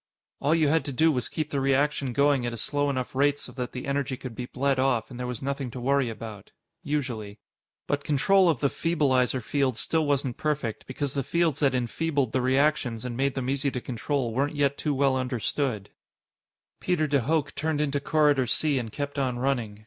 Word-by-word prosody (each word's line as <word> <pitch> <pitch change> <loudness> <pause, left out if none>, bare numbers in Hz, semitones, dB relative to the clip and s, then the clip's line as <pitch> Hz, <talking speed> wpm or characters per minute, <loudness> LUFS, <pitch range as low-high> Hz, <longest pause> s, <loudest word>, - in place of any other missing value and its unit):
All 150 +4 +2
you 160 -2 +3
had 160 +2 +3
to 140 - -3
do 160 +5 +3
was 125 -5 -2
keep 155 -1 -3
the 140 - 0
reaction 135 0 +1
going 140 +1 +3
at 120 -1 -2
a - - -5
slow 145 +5 0
enough 130 -2 -2
rate 140 +2 +3
so 125 - -7
that 125 -1 -5
the 125 - -6
energy 140 -1 -1
could 130 -2 -7
be 125 +2 -5
bled 135 +1 0
off, 130 -3 +1
and 125 - -8
there 125 - -3
was 125 -1 -5
nothing 140 -1 -2
to 125 - -7
worry 135 0 +2
about. 110 -3 -8 0.3
Usually. 120 -8 -3 0.5
But 145 0 -1
control 180 +6 +4
of 150 -8 0
the 140 - +4
feebleizer 130 -7 +1
fields 130 0 0
still 160 -2 0
wasn't 140 -4 0
perfect, 145 -7 -2
because 135 +1 -3
the 140 - 0
fields 165 -1 +1
that 140 -3 +2
enfeebled 135 +1 0
the 130 - +1
reactions 130 -3 +1
and 120 -1 -4
made 135 +2 0
them 130 -2 -2
easy 140 +1 0
to 130 - -3
control 125 0 -2
weren't 140 +5 0
yet 140 -1 +2
too 150 -1 -1
well 135 -1 +3
understood. 125 -3 -2 0.9
Peter 175 -4 +1
de 145 -1 +2
Hooch 150 +3 0
turned 155 -1 -1
into 145 -1 0
Corridor 145 -3 +3
C 145 +3 +2
and 115 -3 -5
kept 145 +3 -4
on 130 -3 0
running. 120 -5 -1
135 Hz, 210 wpm, -27 LUFS, 125-145 Hz, 0.9 s, control